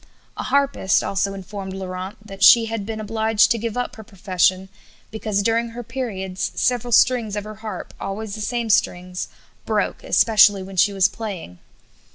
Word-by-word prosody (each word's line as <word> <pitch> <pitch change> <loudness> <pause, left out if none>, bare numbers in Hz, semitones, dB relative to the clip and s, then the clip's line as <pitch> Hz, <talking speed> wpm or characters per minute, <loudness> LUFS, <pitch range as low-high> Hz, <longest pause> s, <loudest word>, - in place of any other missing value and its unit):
A - - -5
harpist 275 -8 +1
also 195 0 -1
informed 195 0 -7
Laurent 185 0 -6
that 195 -1 -6
she 230 +3 +8
had 225 -2 -4
been 220 -1 -4
obliged 220 0 +2
to 230 - +1
give 230 +1 -4
up 245 - -3
her 220 - -9
profession 190 -1 0 0.4
because 215 -2 -1
during 230 +2 +1
her 240 +1 -7
periods 210 -6 -4
several 245 -1 0
strings 230 -3 +3
of 205 - -3
her 215 0 -9
harp, 215 -5 -7
always 200 +2 -5
the 215 - -5
same 235 0 -1
strings, 180 -2 0 0.4
broke, - - -1
especially 210 -3 +4
when 190 0 -10
she 190 +3 +4
was 195 -2 +3
playing. 195 - -7
210 Hz, 170 wpm, -22 LUFS, 190-225 Hz, 0.4 s, she